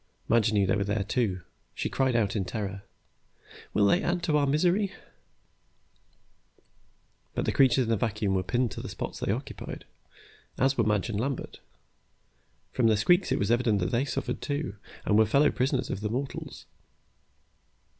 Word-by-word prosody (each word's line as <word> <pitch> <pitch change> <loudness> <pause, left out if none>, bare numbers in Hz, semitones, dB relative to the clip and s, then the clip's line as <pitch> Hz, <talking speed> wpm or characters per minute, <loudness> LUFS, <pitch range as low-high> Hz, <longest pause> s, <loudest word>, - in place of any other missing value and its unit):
Madge 110 -2 +3
knew 100 -2 +3
they 95 - +2
were 100 - 0
there, 100 +1 -1
too. 100 -4 -1 0.3
She - - -2
cried 130 -2 +1
out 110 -3 +1
in 100 - 0
terror, 100 0 -4 0.9
"Will 105 - +3
they 100 - +4
add 175 0 -1
to 155 - +1
our 145 -1 +3
misery?" 180 +8 +2 2.4
But - - -1
the - - +1
creatures 130 -1 +4
in 115 - -4
the 115 - +2
vacuum 105 -2 -1
were 95 - +2
pinned 120 +5 0
to - - -6
the - - -7
spots - - -5
they - - -1
occupied, - - -5 0.7
as 135 +1 +2
were 115 - +2
Madge 105 0 +1
and 105 -2 -2
Lambert. 135 +3 -3 1.1
From 120 -3 +3
their 110 -1 +4
squeaks 175 - +3
it - - +2
was 100 +3 0
evident 120 -4 +2
they 120 +2 +2
suffered, - - -3
too, 145 -8 -2 0.3
and 105 0 +4
were 110 - +6
fellow 140 +7 +4
prisoners 130 0 0
of 95 - -4
the 105 - -2
mortals. 130 +5 -5
115 Hz, 170 wpm, -28 LUFS, 105-135 Hz, 2.4 s, were